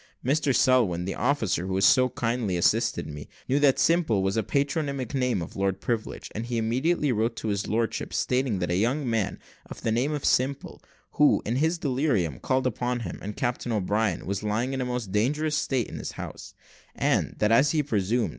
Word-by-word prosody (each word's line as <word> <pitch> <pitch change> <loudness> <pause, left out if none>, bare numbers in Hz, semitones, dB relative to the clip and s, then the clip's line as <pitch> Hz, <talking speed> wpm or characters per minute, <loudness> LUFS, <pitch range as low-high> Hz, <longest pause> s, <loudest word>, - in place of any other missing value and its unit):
Mr 140 +1 +2
Selwin, 120 -10 +3
the 95 - -2
officer 110 -8 0
who 95 - -2
had 95 - +1
so 130 +4 +5
kindly 115 -6 -1
assisted 85 - +1
me, 75 0 -8 0.2
knew 135 +2 +2
that 145 -2 +4
Simple 155 - +2
was 95 0 +1
the 110 - +1
patronymic 140 0 -1
name 125 -8 0
of - - -10
Lord 95 -1 -1
Privilege, 115 -3 -3
and 115 +2 -4
he 120 -1 -2
immediately 130 +7 +1
wrote 115 +1 0
to 110 - -4
his 100 0 -1
lordship, 115 +1 -1
stating 125 -4 0
that 90 -1 -2
a - - +1
young 125 +8 0
man 115 -4 -1 0.3
of - - -10
the 115 - +1
name 125 +6 +1
of 150 -2 -3
Simple, 135 +2 0 0.3
who, - - +3
in 115 +4 -1
his 160 +4 +1
delirium 125 - 0
called 130 0 0
upon 125 0 -1
him 90 -7 -6
and 105 +1 -6
Captain 120 0 -2
O'Brien, 105 -2 0
was 100 0 -2
lying 110 +5 -1
in 135 - -2
a - - -1
most 125 -5 -3
dangerous 150 +9 +1
state 135 -5 0
in - - -7
his - - -5
house, - - -8 0.4
and, - - 0
that 105 0 +2
as 135 +6 +5
he 150 0 +1
presumed. 115 -2 0
120 Hz, 200 wpm, -26 LUFS, 105-135 Hz, 0.4 s, so